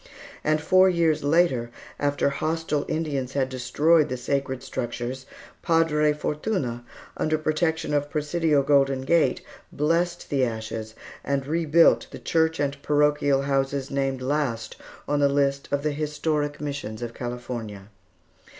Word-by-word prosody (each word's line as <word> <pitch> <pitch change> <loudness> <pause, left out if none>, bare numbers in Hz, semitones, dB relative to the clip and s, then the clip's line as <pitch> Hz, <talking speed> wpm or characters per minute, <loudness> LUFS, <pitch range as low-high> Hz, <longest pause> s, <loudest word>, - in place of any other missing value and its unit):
And 155 0 +2
four 185 +4 +5
years 165 -4 +1
later, 145 -6 +2 0.3
after 145 -1 +1
hostile 155 0 -1
Indians 140 -5 -2
had 135 -2 0
destroyed 145 +5 +2
the 130 - -3
sacred 130 0 -2
structures, 125 +1 -4 0.3
Padre 165 -3 +3
Fortune, 150 - -2 0.3
under 155 0 +1
protection 155 0 -1
of 145 0 0
Presidio 150 0 +1
Golden 135 -1 +3
Gate, 140 -1 +2 0.3
blessed 170 +4 0
the 135 -2 +2
ashes 110 -1 -4 0.3
and 140 -1 -1
rebuilt 165 +2 +3
the - - -9
church 160 -1 +1
and 140 -1 0
the - - -13
parochial 145 -1 +2
houses 135 0 -1
named 135 -2 -1
last 130 -5 -1 0.3
on 145 - +1
the 140 -1 +4
list 140 0 0
of 140 0 0
the 150 - +1
historic 150 0 -2
Missions 140 -7 -5
of 115 -1 -5
California. 120 -5 -6
145 Hz, 135 wpm, -25 LUFS, 130-155 Hz, 0.3 s, four